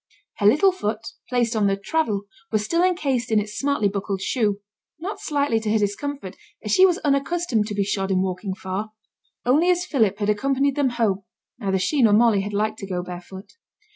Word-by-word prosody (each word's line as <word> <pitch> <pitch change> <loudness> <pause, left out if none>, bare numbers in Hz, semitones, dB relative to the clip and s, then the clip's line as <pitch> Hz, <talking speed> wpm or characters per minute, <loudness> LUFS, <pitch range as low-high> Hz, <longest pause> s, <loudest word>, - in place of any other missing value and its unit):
Her 205 - +3
little 305 - +5
foot, 225 - -4 0.2
placed 240 -2 +1
on 210 -2 +2
the 195 0 +1
'traddle', 210 -2 -1 0.3
was 215 -1 0
still 335 +8 +1
encased 275 -10 0
in 220 - +4
its 210 0 -5
smartly 280 -4 +1
buckled 200 0 -3
shoe 205 -1 0 0.4
not 400 +5 -5
slightly 285 - 0
to 215 -1 -2
her 220 - +3
discomfort, 205 +1 -3 0.3
as 210 - -3
she 375 - +7
was 355 -2 +1
unaccustomed 275 -5 +1
to 210 - -4
be 200 - +1
shod 195 -1 -2
in 185 -1 +2
walking 190 +1 -3
far; 200 +2 -5 0.5
only 300 +8 +3
as 360 0 +2
Philip 220 - +1
had 205 -1 -2
accompanied 275 +5 +1
them 285 -3 +2
home, 225 -5 0 0.4
neither 195 -4 0
she 260 +10 +1
nor 220 -3 +5
Molly 220 -2 +4
had 205 +1 -4
liked 215 +2 -1
to 195 - -6
go 180 -2 -3
barefoot. 180 +2 -9
215 Hz, 200 wpm, -23 LUFS, 200-280 Hz, 0.5 s, she